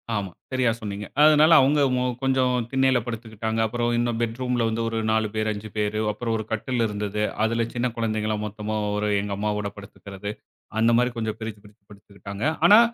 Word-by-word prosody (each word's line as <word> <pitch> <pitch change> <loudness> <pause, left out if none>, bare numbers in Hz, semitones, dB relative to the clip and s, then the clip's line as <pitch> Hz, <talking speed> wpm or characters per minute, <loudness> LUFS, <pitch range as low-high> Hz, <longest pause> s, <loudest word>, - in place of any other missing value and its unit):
ஆமா, 100 -3 -2 0.2
சரியா 130 -3 +2
சொன்னீங்க. 105 -1 -5 0.2
அதனால 155 +1 +6
அவுங்க 145 +3 +3 0.2
அ - - 0 0.2
கொஞ்சம் 130 -1 +2 0.2
திண்ணையில 130 -2 +3
படுத்துக்கிட்டாங்க, 110 -1 -4
அப்புறம் 120 +1 -1
இன்னும் 120 -1 0
பெட்ரூம்‌ 125 +2 -1
ல - - +2
வந்து 115 +1 -2
ஒரு 115 - -3
4 110 -1 +2
பேர், 110 0 0
5 105 +1 -7
பேரு. 105 0 0
அப்புறம் 115 +2 -3
ஒரு 110 - -3
கட்டில் 115 +2 -1
இருந்தது. 105 0 -3 0.2
அதில 115 +1 +1
சின்ன 125 +1 0
குழந்தைகள்லாம் 110 -2 -1
மொத்தமா 105 +1 -4 0.2
ஒரு 105 0 0
எங்க 100 0 -4
அம்மாவோட 105 0 -1
படுத்துக்கிறது. 100 0 -8 0.5
அந்த 115 +1 +4
மாதிரி 125 +1 +2
கொஞ்சம் 110 -1 -2
பிரிச்சு, 110 -2 -6
பிரிச்சு 105 +1 -19
படுத்துக்கிட்டாங்க. 100 0 -9 0.2
ஆனா 210 +3 +9
110 Hz, 175 wpm, -24 LUFS, 105-120 Hz, 0.5 s, ஆனா